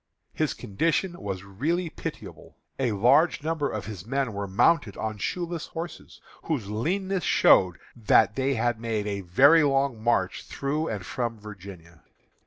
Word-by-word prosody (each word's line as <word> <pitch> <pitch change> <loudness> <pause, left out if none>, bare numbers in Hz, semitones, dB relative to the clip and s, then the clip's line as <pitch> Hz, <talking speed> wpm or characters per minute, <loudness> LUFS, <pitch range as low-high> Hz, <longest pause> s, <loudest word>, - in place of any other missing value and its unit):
His - - -1
condition 165 - -1
was 95 -2 -4
really 155 - -2
pitiable. - - -8 0.2
A 130 -3 +1
large 140 - +3
number 155 -2 -1
of 105 - -5
his 105 -6 -7
men 135 +1 -2
were 100 0 -4
mounted 105 - +2
on 110 -1 -4
shoeless 175 - -3
horses, 165 +1 -8 0.3
whose 120 -11 -2
leanness 185 - -1
showed 90 -9 +4 0.2
that 110 -1 +3
they 135 0 0
had 120 0 0
made 110 -3 -2
many 105 - +4
a 145 - +3
long 135 -4 0
march 120 +1 0
through 150 +3 -2
and 100 -5 -4
from 120 -3 -3
Virginia. 95 -5 -11
120 Hz, 150 wpm, -26 LUFS, 100-155 Hz, 0.3 s, showed